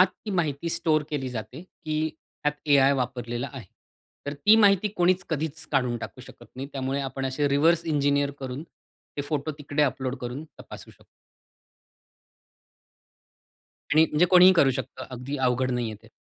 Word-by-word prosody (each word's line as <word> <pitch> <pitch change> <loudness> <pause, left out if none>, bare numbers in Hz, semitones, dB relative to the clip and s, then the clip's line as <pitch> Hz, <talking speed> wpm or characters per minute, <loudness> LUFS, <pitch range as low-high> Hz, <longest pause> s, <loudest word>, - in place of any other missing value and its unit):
आत 185 - +8 0.2
ती 210 - -2
माहिती 170 -3 -1
स्टोअर 155 -2 +2
केली 135 -3 -2
जाते, 125 +4 -7
की 155 -3 -3
त्यात 150 - -4
एआय 140 -1 +5
वापरलेला 125 -1 -3
आहे. 125 -9 -9 0.6
तर 145 - -3
ती 210 +10 +5
माहिती 200 -1 +4
कोणीच 185 +1 +2
कधीच 160 0 -3
काढून 125 -4 +1
टाकू - - -8
शकत - - -14
नाही, 135 +2 -5
त्यामुळे 135 0 -2
आपण 135 0 -3
असे 140 +2 0
रिव्हर्स 160 +4 +3
इंजिनिअर 145 -2 +1
करून 130 +2 -5
ते 145 - -11
फोटो 145 +1 -2
तिकडे 145 0 -1
अपलोड 130 -1 -1
करून 125 +5 -5 0.2
तपासू - - -11
शकतो. - - -22 2.9
आणि 160 +1 +6
म्हणजे 150 +4 +3
कोणीही 180 +1 +7
करू 140 -7 +4
शकतं 130 -1 -6
अगदी 130 +3 -5
अवघड 130 0 +1
नाहीये 120 -3 -2
ते. - - -16
140 Hz, 155 wpm, -26 LUFS, 130-160 Hz, 2.9 s, आत